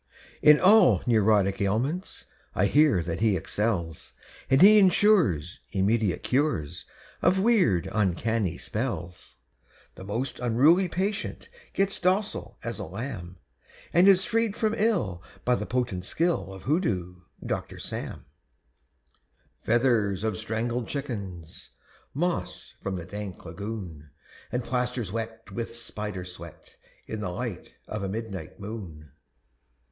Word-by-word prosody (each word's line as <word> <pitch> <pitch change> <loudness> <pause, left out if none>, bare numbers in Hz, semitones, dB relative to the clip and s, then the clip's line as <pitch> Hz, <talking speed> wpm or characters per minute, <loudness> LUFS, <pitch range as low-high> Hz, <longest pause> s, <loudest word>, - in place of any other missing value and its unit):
_ - - -47 0.4
In 150 0 +7
all 185 - +6
neurotic 105 -3 +3
ailments 125 - -1 0.3
I 95 - +3
hear 140 - +4
that 85 0 -3
he 110 -3 +3
excels, 85 -3 -2 0.4
And 135 0 +5
he 210 +4 +9
insures 175 - +3
Immediate 100 -1 +1
cures 130 - 0 0.4
Of 180 +2 +4
weird, 185 - +3
uncanny 105 -1 0
spells; 90 -7 -4 0.6
The - - -11
most 115 +7 -3
unruly 140 +10 +4
patient 200 +4 -3 0.3
Gets 195 0 +1
docile 185 +3 0
as - - -4
a - - -3
lamb 95 - -6 0.6
And 175 +3 +6
is 190 -1 +6
freed 225 -2 0
from 220 -1 +1
ill 200 - 0 0.2
by 125 - +3
the - - -2
potent 120 -8 -1
skill 160 - 0
Of 95 -1 -10
Hoodoo 100 - -1 0.3
Doctor - - -3
Sam; 65 - -6 1.4
Feathers 110 -5 +2
of 110 -1 0
strangled 115 +2 -2
chickens, 100 - -6 0.5
Moss 135 - -2
from 95 - -3
the 85 -2 -5
dank 100 0 -7
lagoon, 85 -4 -7 0.4
_And 125 0 -1
plasters 125 -4 -2
wet 115 -1 -5
With 115 +2 -5
spider 105 -5 -5
sweat 85 -3 -11 0.3
In 110 - -5
the 100 - -3
light 100 +1 -6
of 105 - -4
a 100 - -2
midnight 100 -4 -6
moon! 95 -9 -8
110 Hz, 125 wpm, -27 LUFS, 95-140 Hz, 1.4 s, he